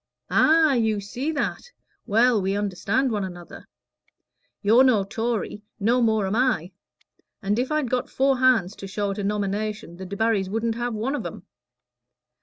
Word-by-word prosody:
"Ah, 315 -2 +5
you 220 -4 +1
see 245 +9 -4
that? 295 -3 -2 0.5
Well, 225 +1 +3
we 195 +1 -1
understand 205 +6 0
one 210 -2 -1
another. 175 -2 -9 1.0
You're 225 +6 +6
no 240 -7 +4
Tory; 225 +1 -3 0.2
no 235 +5 +2
more 220 -3 +2
am 190 +2 -1
I. 220 -8 +1 0.7
And 205 +3 0
if 255 +4 -1
I'd 305 -5 0
got 255 0 -1
four 270 -1 +1
hands 225 -7 +3
to 195 - -7
show 200 +1 -2
at 195 - -5
a - - -2
nomination, 205 -2 -3
the 190 - -7
Debarrys 200 0 0
shouldn't 225 +1 -1
have 240 0 -3
one 230 +6 -2
of 290 - -3
'em. - - -8
220 Hz, 165 wpm, -24 LUFS, 200-250 Hz, 1.0 s, You're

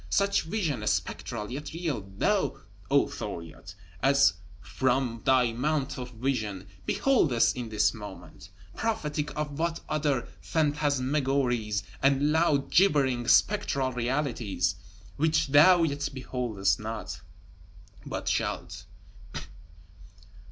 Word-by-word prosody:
Such 200 0 +2
vision 165 - -2
(spectral, 105 +1 -2
yet 145 +3 -6
real) 165 -9 -2 0.2
thou, - - +1 0.3
O - - +4
Thuriot, 85 +3 -7 0.3
as 140 +1 +5 0.3
from 120 +5 -1
thy 125 -3 +4
Mount 135 +2 -1
of 125 0 -5
Vision, 110 -6 -2 0.2
beholdest 160 - +3
in 120 -2 -5
this 105 -1 +2
moment: 95 -3 -10 0.3
prophetic 155 -10 -2
of 150 -1 -3
what 165 0 0
other 145 -5 0
Phantasmagories 135 -7 0 0.2
and 140 +2 +3
loud 155 -3 +2
gibbering 135 -10 +3
Spectral 135 -8 +3
Realities 120 -8 -1 0.4
which 155 -1 +2
thou 165 +5 +7
yet 145 -2 -1
beholdest 125 -7 -1
not, 110 +1 -6 0.8
but - - -5
shalt! 95 +3 -2
135 Hz, 100 wpm, -28 LUFS, 115-150 Hz, 0.8 s, thou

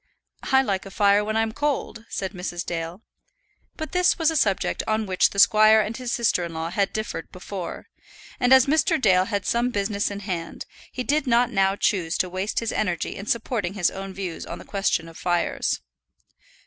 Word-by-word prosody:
"I 265 0 +5
like 195 -5 -2
a - - -8
fire 205 0 +3
when 215 +1 -1
I'm 225 0 +1
cold," 260 -4 -2
said 190 -1 -3
Mrs. 180 -2 -5
Dale. 170 +4 -5 0.7
But 315 - -5
this 360 0 +3
was 325 -2 +2
a - - -4
subject 200 -10 +1
on 220 0 0
which 185 -2 +3
the - - -10
squire 215 +2 +6
and 215 +1 -1
his 250 -1 -4
sister 225 -6 +1
in 170 -1 -6
law 160 +1 -3
had 195 +1 0
differed 215 0 -5
before, - - -7 0.5
and 245 - +2
as 265 -1 +8
Mr. 315 +3 +2
Dale 185 -6 +4
had 205 -1 -2
some 240 +1 +1
business 200 -2 -1
in 200 0 -6
hand, 175 -5 -5 0.3
he 255 - -4
did 290 +1 0
not 240 0 +3
now 195 -2 +2
choose 175 -5 0
to 185 - 0
waste 190 +5 -2
his 230 - -2
energy 180 -5 -2
in 200 - -8
supporting 220 -5 -1
his 180 -4 +1
own 195 0 -6
views 185 -3 -5
on - - -7
the - - -12
question 195 -4 0
of 165 - -12
fires. 175 -1 0
205 Hz, 200 wpm, -24 LUFS, 185-235 Hz, 0.7 s, as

